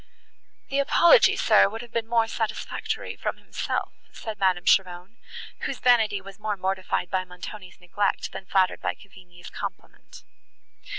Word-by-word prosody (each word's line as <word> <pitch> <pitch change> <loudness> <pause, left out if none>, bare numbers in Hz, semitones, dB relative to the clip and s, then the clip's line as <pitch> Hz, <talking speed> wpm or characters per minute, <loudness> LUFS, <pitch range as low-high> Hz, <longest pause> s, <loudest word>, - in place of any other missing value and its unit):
"The 275 - 0
apology, 340 - +6
sir, - - +5
would 225 +3 -7
have 240 - -13
been 230 -1 -2
more 230 -1 +3
satisfactory 225 -1 -4
from - - -3
himself," - - -4 0.2
said 215 -2 -7
Madame 185 -2 +2
Cheron, 185 +3 +1 0.4
whose - - -3
vanity 225 -5 +3
was 195 +1 -12
more 210 -1 -2
mortified 185 -1 -2
by 185 -1 0
Montoni's 185 +2 -10
neglect, 195 +3 -1
than 190 - -8
flattered 185 -1 +2
by - - -2
Cavigni's 180 -3 -15
compliment. - - -9
200 Hz, 140 wpm, -25 LUFS, 185-225 Hz, 0.4 s, apology